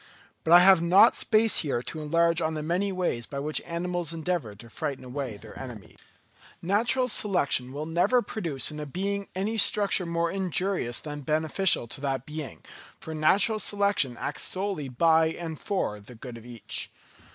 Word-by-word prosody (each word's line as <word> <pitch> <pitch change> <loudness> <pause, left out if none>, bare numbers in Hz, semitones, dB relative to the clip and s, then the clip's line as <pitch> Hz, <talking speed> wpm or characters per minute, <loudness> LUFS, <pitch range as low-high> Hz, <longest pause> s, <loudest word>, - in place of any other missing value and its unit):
But 160 - -1
I 175 +1 +10
have 190 -2 +7
not 175 +3 +6
space 220 -1 +3
here 135 -6 -1
to 155 - -6
enlarge 170 +2 +2
on 160 0 -1
the 155 - -4
many 180 +5 0
ways 180 -11 -2
by 140 - -7
which 150 +2 -1
animals 175 -1 -2
endeavour 165 - -3
to 115 +3 -13
frighten 130 +3 -5
away 125 -4 -5
their 110 +1 -13
enemies. 120 -6 -10 0.6
Natural 230 +8 +1
selection 175 - 0
will 145 +3 -5
never 175 +10 +2
produce 165 - -2
in 150 - -7
a 150 - -5
being 200 +6 -3
any 215 +4 -1
structure 200 -3 +3
more 170 0 -1
injurious 185 -8 -1
than 150 -1 -7
beneficial 155 0 +2
to 135 - -4
that 135 -2 -2
being, 150 -2 -7 0.4
for 160 - -7
natural 200 +8 +3
selection 200 -13 0
acts 145 - -3
solely 185 -7 -2
by 160 +5 +3
and 160 -1 -5
for 185 - -2
the 110 +5 -14
good 120 +1 -9
of 115 +1 -12
each. 120 -2 -5
160 Hz, 175 wpm, -27 LUFS, 140-190 Hz, 0.6 s, I